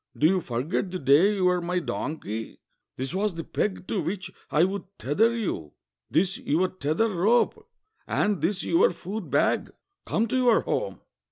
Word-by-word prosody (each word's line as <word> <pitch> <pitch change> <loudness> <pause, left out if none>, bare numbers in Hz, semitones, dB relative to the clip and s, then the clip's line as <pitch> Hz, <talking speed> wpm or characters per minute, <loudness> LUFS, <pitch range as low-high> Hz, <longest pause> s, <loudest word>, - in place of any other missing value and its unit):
Do 150 - +2
you 185 +3 +4
forget 140 +9 -2
the 185 - -3
day 160 +8 +4
you 190 -2 +1
were 180 -1 +3
my 175 +1 -1
donkey? 130 - -4 0.4
This 130 +5 -3
was 200 -1 0
the 165 - -4
peg 190 +1 -2
to 200 - -1
which 180 +3 -4 0.2
I 155 - +3
would 195 +1 -1
tether 225 - +2
you, 80 - -3 0.4
this 180 +3 +1
your 175 +6 +1
tether 185 +6 0
rope, 210 +7 +2 0.4
and 205 -4 +1
this 185 +3 0
your 165 - +4
food 190 0 -6
bag; 140 - +2 0.4
come 225 +2 +1
to 260 - +1
your 245 -3 +4
home!" - - -2
180 Hz, 170 wpm, -26 LUFS, 155-205 Hz, 0.4 s, you